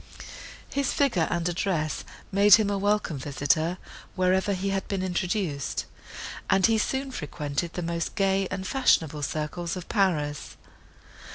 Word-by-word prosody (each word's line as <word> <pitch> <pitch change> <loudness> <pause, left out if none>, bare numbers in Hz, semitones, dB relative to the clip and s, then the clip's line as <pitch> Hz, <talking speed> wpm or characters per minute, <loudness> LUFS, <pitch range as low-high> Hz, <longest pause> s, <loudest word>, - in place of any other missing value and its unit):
His 280 -1 0
figure 235 - +2
and 170 -1 0
address 170 -3 -1 0.3
made 200 +1 +8
him 215 -2 +1
a 200 - 0
welcome 205 -7 0
visitor, 150 +5 0 0.4
wherever 185 +2 +2
he 195 +1 -2
had 195 0 -2
been 195 -2 -2
introduced, 180 - -1 0.6
and 190 -1 +4
he 225 -1 +3
soon 265 +4 -1
frequented 150 - -3
the 180 - -3
most 170 0 -3
gay 195 -1 +2
and 190 0 -4
fashionable 165 - +2
circles 155 +4 -3
of 180 -2 -7
Paris. 155 -8 0
185 Hz, 135 wpm, -27 LUFS, 160-200 Hz, 0.6 s, made